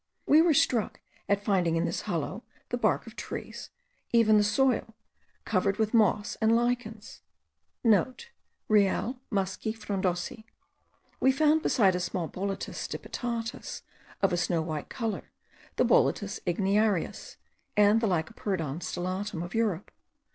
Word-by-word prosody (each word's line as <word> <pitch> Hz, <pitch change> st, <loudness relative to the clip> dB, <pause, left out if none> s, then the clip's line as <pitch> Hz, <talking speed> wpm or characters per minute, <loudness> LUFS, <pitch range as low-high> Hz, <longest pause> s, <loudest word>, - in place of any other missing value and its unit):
We 305 Hz, +2 st, +6 dB
were 330 Hz, -3 st, +4 dB
struck 235 Hz, -5 st, +1 dB, 0.3 s
at 200 Hz, 0 st, +2 dB
finding 180 Hz, -6 st, +2 dB
in 165 Hz, +1 st, +1 dB
this -, -, -2 dB
hollow -, -, -3 dB, 0.3 s
the -, -, -1 dB
bark -, -, +1 dB
of -, -, -12 dB
trees, -, -, -7 dB, 0.4 s
and 235 Hz, -, +5 dB
even 215 Hz, -2 st, +5 dB
the 210 Hz, -, +4 dB
soil, 225 Hz, 0 st, +1 dB, 0.5 s
covered 195 Hz, -1 st, +1 dB
with 220 Hz, 0 st, 0 dB
moss* 210 Hz, -2 st, +3 dB
and 220 Hz, +1 st, +4 dB
lichens. 235 Hz, -2 st, -2 dB, 0.4 s
(* -, -, -51 dB, 0.8 s
Real 215 Hz, +4 st, +2 dB
musci 195 Hz, +1 st, -2 dB
frondosi. 195 Hz, 0 st, -2 dB, 0.7 s
We 265 Hz, -, +4 dB
also -, -, -10 dB
found, 310 Hz, +1 st, +4 dB
besides 195 Hz, -, +3 dB
a -, -, -3 dB
small 180 Hz, -1 st, -2 dB
Boletus 195 Hz, +3 st, -4 dB
stipitatus, 235 Hz, -1 st, -5 dB, 0.4 s
of 195 Hz, -, +3 dB
a -, -, +1 dB
snow 170 Hz, -2 st, 0 dB
white 155 Hz, -2 st, -5 dB
colour, 225 Hz, -3 st, -4 dB, 0.5 s
the -, -, +3 dB
Boletus 205 Hz, -, +2 dB
igniarius, 195 Hz, +1 st, 0 dB, 0.4 s
and 210 Hz, +2 st, +5 dB
the 225 Hz, -, +2 dB
Lycoperdon 165 Hz, -3 st, -2 dB
stellatum 185 Hz, +1 st, -3 dB
of 175 Hz, -, -8 dB
Europe. 210 Hz, -5 st, -1 dB
205 Hz, 140 wpm, -28 LUFS, 185-225 Hz, 0.8 s, We